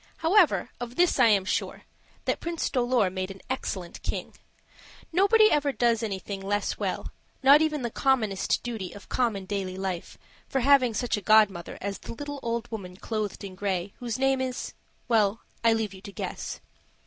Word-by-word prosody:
However, 345 0 +3
of 245 0 -6
this 350 -5 +3
I 245 - +7
am 200 -4 +4
sure, - - -2 0.4
that - - 0
Prince 335 -1 -2
Dolor 245 -6 +2
made 185 0 -3
an 195 0 -9
excellent 185 -9 -4
king. - - -4 0.8
Nobody 430 +4 +5
ever 290 -1 +2
does 235 -3 +2
anything 200 -2 -4
less 205 +1 -1
well, - - -3 0.3
not 280 +3 +8
even 305 -4 0
the 235 - -2
commonest 220 -9 +1
duty 220 -7 -5
of 205 - -13
common 225 -6 0
daily 190 -1 -3
life, 190 -3 -4 0.3
for 270 - 0
having 255 -3 +5
such 240 -1 0
a - - -4
godmother 205 -4 +3
as 200 0 -3
the - - -8
little 290 +2 -6
old 235 0 -2
woman 185 -5 -6
clothed 215 -2 -3
in 195 -2 -7
gray, 190 -1 -2
whose 235 -3 -3
name 270 0 +2
is 255 -1 -3 0.3
well, 220 -2 +2 0.2
I 230 - +5
leave 220 -3 -1
you 190 - -12
to 200 - -9
guess. - - -5
225 Hz, 175 wpm, -27 LUFS, 195-265 Hz, 0.8 s, not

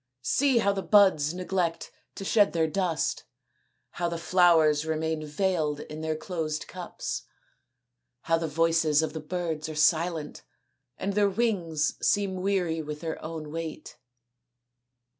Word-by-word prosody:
See 265 - +2
how 200 -3 +3
the 195 - -2
buds 190 -8 +4
neglect 180 -1 -2 0.2
to 195 - -6
shed 205 0 +3
their 165 -1 +2
dust; 170 0 -1 0.7
how 175 0 -2
the 170 - -3
flowers 165 -4 +4
remain 160 0 -2
veiled 155 -2 -1
in 155 +1 -8
their 160 0 -1
closed 155 -2 -3
cups; - - -6 0.9
how 165 0 +1
the 165 - -2
voices 160 -1 +2
of 160 - -3
the 160 - -4
birds 160 -1 -3
are 155 - -6
silent 160 0 +1 0.6
and 200 - -2
their 205 0 +3
wings 185 -9 -1
seem 200 -2 +1
weary 180 -4 0
with 150 -1 -6
their 165 -1 -5
own 155 -2 -6
weight." 165 -1 -6
165 Hz, 140 wpm, -27 LUFS, 155-185 Hz, 0.9 s, buds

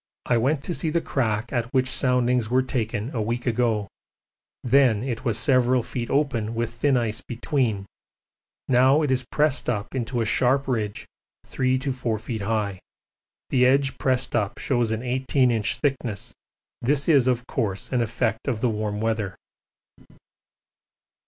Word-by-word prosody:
I 120 - +2
went 135 +5 +1
to 175 - -3
see 165 - -1
the 170 +2 +1
crack 115 -6 -1
at 120 -1 -1
which 130 0 +3
soundings 125 -3 +2
were 130 +2 +3
taken 115 -1 -2
a 115 - 0
week 120 +3 -2
ago 115 -4 +1 0.8
then 125 -4 +4
it 125 -2 -4
was 115 -5 0
several 130 -2 +3
feet 120 0 -5
open 120 -6 0
with 115 0 -2
thin 130 +3 +2
ice 115 -2 -1
between 120 -5 -1 0.8
now 130 +4 +4
it 145 - 0
is 130 0 +1
pressed 150 -3 +1
up 105 -3 -3
into 125 -1 -2
a 115 - +1
sharp 130 +5 +2
ridge 110 -5 -2 0.4
3 130 0 0
to 135 +1 -2
4 120 -3 -2
feet 110 0 -5
high: 100 -2 -1 0.7
the 125 -1 +3
edge 135 +1 +3
pressed 130 -1 0
up 105 +1 0
shows 120 -4 0
an 110 +2 -2
18 130 0 +1
inch 110 -2 0
thickness 125 -8 -2 0.5
this 140 +3 0
is 140 -6 +5
of 120 -1 +1
course 110 -10 -3
an 125 -2 +1
effect 115 0 -1
of 120 -5 0
the 125 - +2
warm 105 -1 -2
weather. 110 -4 -1
120 Hz, 160 wpm, -24 LUFS, 110-130 Hz, 0.8 s, is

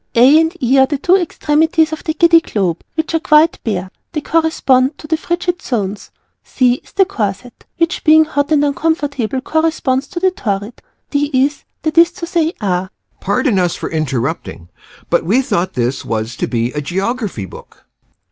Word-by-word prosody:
A. 260 +6 +7
and 325 +2 0
E. 260 +2 +3
are 265 - +5
the 290 - -2
two 355 +7 +3
extremities 320 -2 +1
of 315 - -6
the 315 - -2
Giddy 335 -1 +5
Globe, 185 - -2
which 320 0 -2
are 325 - +2
quite 310 +1 +3
bare. 190 -4 -3 0.2
They 305 - -2
correspond 290 -5 +1
to - - -12
the 320 - 0
Frigid 350 +2 -2
Zones. 210 -5 -3 0.3
C. 250 -1 +1
is - - -22
the 390 -1 +4
Corset, 225 - -5
which 335 +1 0
being 315 0 +6
hot 285 -1 -2
and 290 -1 +3
uncomfortable 280 -5 -1
corresponds 295 -3 0
to 345 - -5
the 375 +1 +2
Torrid. 205 - -4 0.3
D. 290 0 0
is 275 +3 +1 0.2
that 315 +1 +2
is 340 +1 +5
to 340 - -6
say 335 -2 0
are 185 -2 -1 0.3
Pardon 205 +1 +1
us 175 -2 0
for - - -6
interrupting 135 - -3 0.4
but - - +2
we 205 +10 +2
thought 180 -6 -1
this 125 +2 -2
was 110 +1 -3
to - - -2
be 120 0 -1
a 150 - -4
geography 195 - -3
book. - - -14
270 Hz, 180 wpm, -16 LUFS, 195-320 Hz, 0.4 s, A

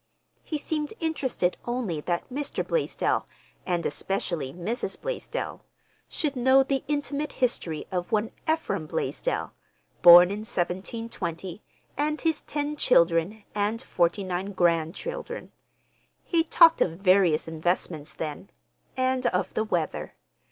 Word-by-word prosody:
He 310 - -3
seemed 300 +4 -3
interested 270 - 0
only 240 -11 -2
that 170 +2 -2
Mr. 290 +1 -2
Blaisdell, - - 0 0.4
and 175 -2 0
especially 170 -8 -2
Mrs. 185 - -3
Blaisdell, - - -4 0.5
should 295 -4 -2
know 260 +2 +5
the 270 0 -1
intimate 290 0 -2
history 175 - -1
of 180 -1 -3
one 220 +1 +1 0.2
Ephraim 200 - -2
Blaisdell, - - -2 0.5
born 175 +1 +10
in 205 - -3
1720, 190 -2 -4 0.4
and 300 +1 0
his 320 -2 0
ten 295 0 -3
children 175 - +3
and 210 +2 0
forty 175 +3 +1
nine 185 +2 -3
grandchildren. 185 - -1 0.7
He 330 -2 +1
talked 330 0 +6
of 165 - +2
various 185 -5 +3
investments 160 -1 -2
then, 155 +4 -5 0.5
and 255 0 +1
of 180 - -1
the 220 - +1
weather. 220 - -2
205 Hz, 120 wpm, -27 LUFS, 175-285 Hz, 0.7 s, born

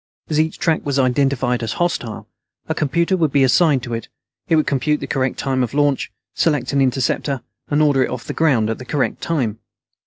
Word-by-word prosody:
As 155 -1 +1
each 160 +1 0
track 165 -2 +1
was 140 -1 -1
identified 130 -1 +1
as 115 -1 -2
hostile, 125 -11 -2 0.4
a - - 0
computer 170 +5 +1
would 160 -5 +1
be 140 -1 +4
assigned 135 0 +3
to 120 -2 -5
it. 115 - -4 0.4
It 165 - +3
would 155 - +3
compute 145 +2 0
the - - -4
correct 130 -2 -1
time 130 -2 0
of 125 +1 -2
launch, 145 -2 +1 0.2
select 145 -5 0
an 140 - +3
interceptor, 135 +1 0 0.3
and 150 +1 +3
order 140 -3 +3
it - - -6
off 125 -2 -5
the - - -4
ground 125 -9 +2
at 115 - -4
the 130 - -8
correct 140 +1 -1
time. 125 -10 -1
135 Hz, 210 wpm, -20 LUFS, 125-155 Hz, 0.4 s, be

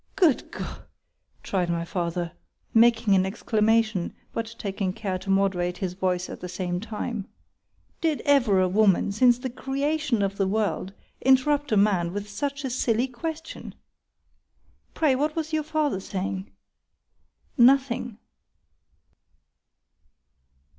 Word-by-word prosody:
—Good 340 -9 +2
G—!_ - - -6 0.6
cried 180 -3 -1
my 170 0 -1
father, 170 -1 -2 0.4
making 225 -2 +5
an 190 -1 +4
exclamation, 215 -1 +1 0.2
but 230 0 -4
taking 195 -2 -2
care 190 -3 -3
to 190 +1 -9
moderate 190 -2 +1
his 185 -3 -3
voice 180 -1 -1
at - - -8
the 180 - -7
same 180 -1 -3
time,——Did 230 - -6
ever 225 -10 +3
woman, 200 0 +3
since 240 +3 +4
the 250 - -4
creation 270 -2 -1
of 195 0 -2
the 195 - +1
world, 205 -2 -1 0.3
interrupt 280 +2 +3
a 215 - +3
man 190 -4 +2
with 205 +1 -4
such 280 +7 -3
a 260 - -2
silly 240 0 +1
question? 320 +6 -6 1.2
Pray, 305 -4 +3
what 300 +3 0
was 320 -1 -3
your 310 - +2
father 305 -7 -1
saying?————Nothing. 215 - -2
215 Hz, 120 wpm, -26 LUFS, 190-265 Hz, 1.2 s, making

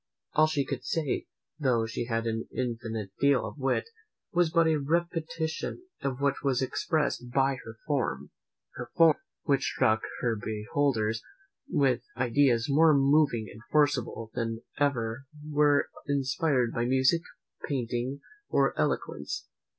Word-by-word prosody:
All 155 +1 +5
she 145 -3 0
could - - -4
say, 155 -5 -1 0.3
though 125 -6 +2
she 115 +1 -3
had 115 -1 -1
an 115 0 -2
infinite 115 -5 -3
deal 140 -2 +3
of - - -8
wit, 135 - 0 0.4
was 175 -2 +3
but 165 0 +4
a 160 -2 +3
repetition 165 - -2 0.2
of 135 -2 -2
what 140 -1 +1
was 135 -3 +2
expressed 130 -1 -1
by 135 +1 +2
her 115 - -9
form; 120 - -1 0.4
her - - -7
form! 165 -2 +6 0.3
which 140 -2 +2
struck 110 +1 +2 0.2
her 115 -2 +1
beholders 110 +1 -1 0.5
with 135 -4 +2 0.2
ideas 125 -1 +3
more 155 +2 +5
moving 135 -5 +3
and 110 - -13
forcible 130 -7 +1
than 115 0 -2 0.2
ever 130 -3 0 0.2
were 145 -1 +3 0.2
inspired 135 -2 +1
by 120 - 0
music, 130 +6 +3 0.5
painting, 125 0 -2 0.3
or - - +3
eloquence." - - -2
135 Hz, 135 wpm, -29 LUFS, 115-145 Hz, 0.5 s, form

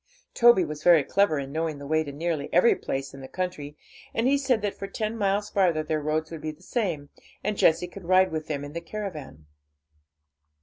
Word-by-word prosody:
Toby 235 -7 +6
was 150 -1 -6
very 170 -3 +6
clever 200 0 +2
in 135 -1 -4
knowing 160 0 -2
the 140 - -9
way 155 +2 +1
to 145 - -7
nearly 150 0 -3
every 180 +7 +5
place 135 0 -4
in 135 - -10
the 130 - -8
country, 150 -4 -5 0.4
and 225 - +1
he 275 +2 +4
said 260 -6 +1
that 205 - -1
for 195 - -7
ten 215 +2 -3
miles 205 -1 0
farther 175 -6 +2
their 155 0 -1
roads 155 +2 -1
would 165 -2 -7
be 155 - -3
the 155 - -10
same, 170 - -2 0.3
and 210 - -1
Jessie 170 -1 +3
could 180 +1 -11
ride 185 +1 +4
with 155 -1 -4
them 145 -2 -3
in 145 - -9
the 170 - -4
caravan. 165 - -7
165 Hz, 215 wpm, -26 LUFS, 150-200 Hz, 0.4 s, Toby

